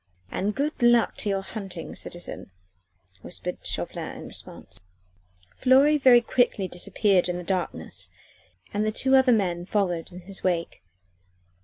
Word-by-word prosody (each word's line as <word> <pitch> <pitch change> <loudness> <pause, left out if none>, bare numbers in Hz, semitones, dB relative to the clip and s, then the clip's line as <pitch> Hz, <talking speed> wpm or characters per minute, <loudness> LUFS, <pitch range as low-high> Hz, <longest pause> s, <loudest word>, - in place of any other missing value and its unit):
"And 205 +2 -1
good 290 +1 -2
luck 240 -1 +4
to 210 - -2
your 195 -1 0
hunting, 195 -5 -7
citizen," 175 - -7 0.7
whispered - - -6
Chauvelin - - -5
in - - -8
response. - - -9 0.8
Fleury 275 +4 +5
very 250 -3 +7
quickly 235 -5 +1
disappeared 190 0 +1
in 175 - -1
the 180 - -5
darkness 175 - -4 0.6
and 205 - 0
the 215 - +1 0.3
other 265 0 +6
two - - +7
men 180 -5 0
followed 180 -6 -1
in 180 +1 -10
his 190 +2 -10
wake. 170 - -1
195 Hz, 140 wpm, -26 LUFS, 180-240 Hz, 0.8 s, very